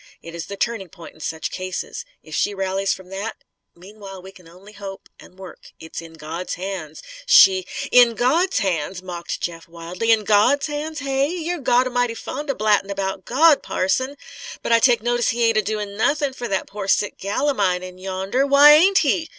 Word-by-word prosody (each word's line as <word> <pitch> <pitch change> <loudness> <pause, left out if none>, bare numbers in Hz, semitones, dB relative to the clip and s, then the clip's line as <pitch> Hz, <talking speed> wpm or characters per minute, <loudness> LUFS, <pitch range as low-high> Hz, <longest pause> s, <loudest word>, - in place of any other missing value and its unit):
It 165 - -10
is 170 -1 -6
the 200 - -7
turning 225 -6 -2
point 165 +1 -13
in - - -21
such 160 0 -4
cases. 185 - -5 0.2
If - - -13
she 205 - 0
rallies 195 0 -1
from 190 -1 -6
that 200 +4 -6 0.3
Meanwhile 195 +1 -12
we 190 - -11
can 180 -3 -18
only 185 +5 -16
hope 195 -1 -9
and 185 - -17
work. 185 -3 -13
It 160 - -13
is - - -3
in 165 -1 -12
God's 160 +3 -6
hands. 180 -5 -6 0.2
She 185 - +6
" - - -5
"In 240 -2 +6
Gawd's 330 +12 +1
hands!" 185 -1 -2
mocked 175 -2 -6
Jeff, 165 -1 -5
wildly. 170 +6 -3
"In 220 -2 +3
Gawd's 215 +8 +3
hands, 300 0 -5
hey? 275 0 0
You're 350 +1 -3
Gawd 250 -1 +2
a'mighty 245 -2 -1
fond 290 +5 -6
of 275 - -1
blattin' 205 -2 +1
'bout 190 -1 -4
Gawd, 300 +4 +4
parson! 260 +10 -1 0.5
But - - -2
I 230 - +6
take 235 -2 +3
notice 240 0 +1
He 235 +1 0
ain't 225 -1 +3
a - - +4
doin' 210 0 -4
nothin' 285 +3 +1
fer 245 -2 -6
that 195 -3 -1
pore 200 -1 -7
sick 205 +1 0
gal 205 +9 -1
of 285 - 0
mine, 185 -2 +1
in 185 0 -10
yonder. 195 +8 -1
Why 280 +1 +8
ain't 375 +6 +5
He? 320 +3 0
205 Hz, 205 wpm, -21 LUFS, 185-255 Hz, 0.5 s, Why